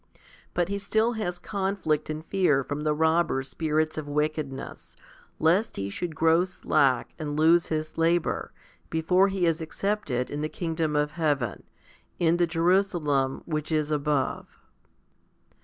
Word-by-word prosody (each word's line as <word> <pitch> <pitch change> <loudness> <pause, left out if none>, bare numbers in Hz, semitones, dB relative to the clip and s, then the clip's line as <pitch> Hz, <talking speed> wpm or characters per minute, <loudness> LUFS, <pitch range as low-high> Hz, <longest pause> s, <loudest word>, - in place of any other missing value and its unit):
But 175 -1 +1
he 200 0 -2
still 220 +3 +1
has 180 -6 -3
conflict 190 -6 -1
and 155 +1 -4
fear 165 -9 +2
from 145 +3 -4
the 150 0 +1
robber 160 -3 +2
spirits 155 +2 -1
of 150 - -7
wickedness, 150 -2 -3 0.4
lest 185 +8 +2
he 100 0 -3
should 170 - -4
grow 165 +1 +4
slftck 140 -8 +1
and 150 -1 -3
lose 165 +2 +4
his 155 0 -3
labour, 165 +1 +1 0.4
before 180 +4 +3
he 190 -2 0
is 165 0 +1
accepted 160 -7 -2
in 145 - -3
the 155 - -2
kingdom 160 -3 -2
of 150 0 +1
heaven, 145 -8 -1 0.6
in 170 0 +3
the 175 -1 +2
Jerusalem 165 -6 +1
which 155 -1 -3
is 155 -1 0
above. 145 -2 -1
160 Hz, 140 wpm, -27 LUFS, 150-175 Hz, 0.6 s, grow